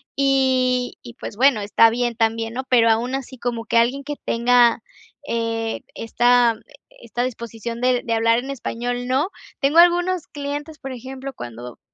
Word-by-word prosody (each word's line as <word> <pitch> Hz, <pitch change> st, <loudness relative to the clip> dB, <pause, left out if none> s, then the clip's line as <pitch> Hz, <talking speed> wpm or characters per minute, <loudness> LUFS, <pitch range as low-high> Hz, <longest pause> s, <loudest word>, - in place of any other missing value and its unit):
Y 260 Hz, -2 st, +1 dB
y 240 Hz, -1 st, -12 dB
pues 225 Hz, -, -8 dB
bueno, 255 Hz, 0 st, +4 dB
está 205 Hz, +2 st, +4 dB
bien, 240 Hz, +1 st, -1 dB
también, 225 Hz, 0 st, 0 dB
¿no? 260 Hz, +2 st, -3 dB
Pero 235 Hz, -2 st, +5 dB
aun 235 Hz, +3 st, +1 dB
así, 265 Hz, -1 st, -5 dB
como 235 Hz, -1 st, -3 dB
que 235 Hz, -, -3 dB
alguien 250 Hz, +4 st, +2 dB
que 295 Hz, 0 st, -4 dB
tenga, 240 Hz, 0 st, +3 dB, 0.5 s
eh, 225 Hz, -1 st, -2 dB
esta 240 Hz, 0 st, +3 dB, 0.5 s
esta 235 Hz, +1 st, -3 dB
disposición, 235 Hz, -1 st, -5 dB
de 250 Hz, -1 st, +2 dB
de 230 Hz, -, -2 dB
hablar 230 Hz, 0 st, +3 dB
en 265 Hz, +3 st, -6 dB
español, 245 Hz, -1 st, -4 dB
no. 270 Hz, +8 st, +1 dB, 0.3 s
Tengo 285 Hz, +4 st, +3 dB
algunos 350 Hz, 0 st, +3 dB
clientes 290 Hz, +2 st, -6 dB
Por 270 Hz, -2 st, -7 dB
ejemplo, 260 Hz, +2 st, -7 dB
cuando 120 Hz, -, -9 dB
245 Hz, 160 wpm, -21 LUFS, 230-265 Hz, 0.5 s, Pero